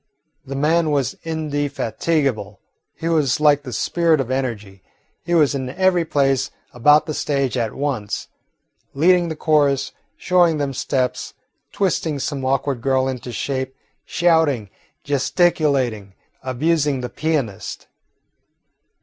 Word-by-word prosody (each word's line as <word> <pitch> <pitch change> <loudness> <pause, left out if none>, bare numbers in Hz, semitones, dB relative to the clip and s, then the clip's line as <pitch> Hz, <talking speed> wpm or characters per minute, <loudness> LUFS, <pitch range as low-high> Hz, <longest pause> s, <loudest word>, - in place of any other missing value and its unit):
The 135 -1 -7
man 160 +3 +2
was 140 -3 0
indefatigable. 145 - -1 0.4
He 165 - -4
was 150 -6 +2
like 145 -1 +4
the 130 -3 -8
spirit 165 +4 +1
of 130 -2 -2
energy. 110 -8 -3 0.4
He 175 +1 +1
was 150 -4 +4
in 130 -2 -3
every 180 +3 +2
place 135 -3 +1 0.2
about 150 +5 +5
the 155 - -4
stage 140 -3 -1
at 115 -3 -2
once, 135 -8 -3 0.7
leading 175 +3 +4
the 160 - -4
chorus, 145 -4 +2 0.3
showing 175 -3 +3
them 140 -2 -2
steps, 130 -1 -2 0.4
twisting 165 -6 0
some 135 0 -3
awkward 135 -1 0
girl 130 0 +1
into 125 -2 -5
shape, 130 +2 -3 0.3
shouting, 160 - +1 0.3
gesticulating, 135 - +1 0.3
abusing 145 +1 0
the 125 - -3
pianist. 140 -8 -3
140 Hz, 120 wpm, -21 LUFS, 130-155 Hz, 0.7 s, about